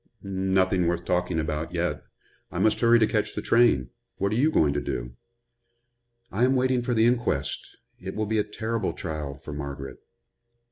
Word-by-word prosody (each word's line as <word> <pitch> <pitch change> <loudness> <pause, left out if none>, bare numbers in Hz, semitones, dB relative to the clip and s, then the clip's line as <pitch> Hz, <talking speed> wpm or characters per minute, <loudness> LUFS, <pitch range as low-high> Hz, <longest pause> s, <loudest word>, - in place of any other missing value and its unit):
"Nothing 95 -2 +1
worth 85 0 -1
talking 90 -2 0
about, 80 +2 -3
yet. 85 0 -1 0.5
I - - -5
must 110 - +2
hurry 120 0 +6
to 110 - +4
catch 110 -1 -1
the - - -2
train. 115 - +3 0.3
What 100 +1 0
are - - 0
you 140 +7 +3
going 75 - +3
to 75 - -1
do?" - - -4 1.2
"I 110 +5 +1
am 130 +1 +4
waiting 130 -1 +2
for 120 0 -1
the 110 0 +4
inquest. 120 - 0 0.2
It 95 +1 -6
will 110 - -1
be 110 +1 0
a - - +3
terrible 110 +2 -2
trial 75 -5 -5
for 70 +2 -9
Margaret." 70 -2 -6
95 Hz, 180 wpm, -26 LUFS, 75-115 Hz, 1.2 s, hurry